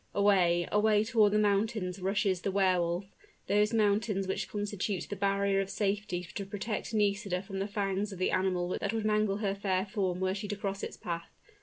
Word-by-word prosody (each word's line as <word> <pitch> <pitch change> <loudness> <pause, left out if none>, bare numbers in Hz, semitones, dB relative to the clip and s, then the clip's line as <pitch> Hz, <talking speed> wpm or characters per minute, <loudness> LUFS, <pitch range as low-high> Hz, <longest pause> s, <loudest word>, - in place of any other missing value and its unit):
Away 180 -4 +3
away 210 0 +4
toward 220 -2 +3
the 210 - +3
mountains 205 -2 +1
rushes 195 -1 +1
the 195 - -1
Wehr 190 -2 +3
Wolf, 175 +2 -1 0.4
those 210 +1 +2
mountains 210 -2 +1
which 190 - -2
constitute 205 -2 -2
the - - -1
barrier 200 0 +1
of 195 - -4
safety 195 -3 -2
to 200 - -3
protect 205 +3 -4
Nisida 200 -3 0
from 195 -1 -5
the 195 - -1
fangs 200 -1 -1
of 190 - -7
the 185 - +1
animal 185 -1 0
that - - -2
would 220 -1 -1
mangle 215 -2 +2
her 195 - +1
fair 190 -2 0
form 190 -4 -1
were 190 0 +1
she 205 +1 -4
to 205 - -3
cross 195 -1 -4
its - - -6
path. 170 -1 -5
200 Hz, 195 wpm, -31 LUFS, 190-210 Hz, 0.4 s, away